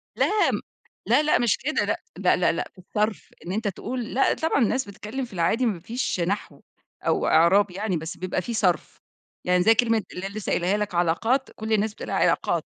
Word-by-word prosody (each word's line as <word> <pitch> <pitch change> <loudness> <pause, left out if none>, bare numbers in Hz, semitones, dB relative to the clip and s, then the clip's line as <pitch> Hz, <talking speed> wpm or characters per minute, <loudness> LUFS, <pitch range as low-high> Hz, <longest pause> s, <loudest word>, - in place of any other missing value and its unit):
لا 420 0 +2
م - - -1 0.5
لا، 300 - +4
لا، 305 - +3
مش 240 -3 +2
كده 305 +4 -1
لأ، - - 0 0.2
لأ، - - +3
لأ، - - +2
لأ، - - -3
في - - -42
الصرف، 210 +3 -2
إن 180 - -4
أنتَ 215 +1 -1
تقول 235 +4 -4
لأ 270 - +3
طبعًا 320 -4 0
الناس 255 +3 0
بتتكلم 215 +6 -5
في 235 - -15
العادي 185 +9 +1
ما 200 -7 0
فيش 230 0 -3
نحو 190 +4 -2 0.4
أو - - +1
إعراب 180 +4 +4
يعني، 195 -1 -2
بس 160 +2 -6
بيبقى 185 0 -2
في 235 - -5
صرف. 180 -7 0 0.5
يعني 180 0 +3
زي 225 - +6
كلمة 225 -2 +2
اللي 185 +2 -5
أنا 200 - -10
لسة 215 -2 -5
قايلاها 185 +4 +1
لك 210 -4 -3
عَلاقات، 225 +11 +1
كل 220 0 -3
الناس 215 0 +1
بتقولها - - -5
عِلاقات. - - +1
210 Hz, 205 wpm, -25 LUFS, 180-235 Hz, 0.5 s, زي